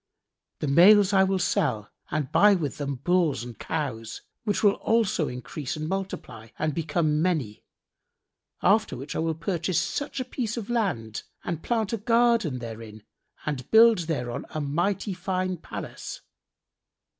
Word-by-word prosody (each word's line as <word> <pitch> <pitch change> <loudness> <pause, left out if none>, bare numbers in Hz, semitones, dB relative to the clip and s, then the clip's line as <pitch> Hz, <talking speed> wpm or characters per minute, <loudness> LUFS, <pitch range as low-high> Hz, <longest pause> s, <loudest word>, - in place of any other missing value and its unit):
The 150 - -1
males 195 +7 +6
I 190 -1 +6
will 190 0 +1
sell 110 - 0 0.2
and 150 -4 -2
buy 205 0 +6
with 150 -7 -3
them 140 -1 -2
bulls 150 -2 +1
and 120 -3 -9
cows, 115 -8 -4 0.2
which 205 -1 0
will 205 - +7
also 220 -10 +1
increase 130 +4 -5
and 155 0 -4
multiply 150 - -5
and 155 0 -1
become 155 -1 0
many; 155 - -1 1.0
after 215 - +3
which 135 +4 -7
I - - -1
will 160 0 0
purchase 170 +1 -1
such 285 -1 -3
a 255 - -2
piece 240 -3 -3
of 230 0 -4
land 145 - -1 0.2
and 170 -3 -3
plant 225 -3 -1
a - - +1
garden 230 - +2
therein 110 -2 -8 0.4
and 140 -4 -3
build 225 -2 +7
thereon 125 -7 -3
a 155 - -4
mighty 175 +8 -1
fine[FN#69] 185 -1 -2
palace. - - -7
165 Hz, 150 wpm, -26 LUFS, 140-200 Hz, 1.0 s, will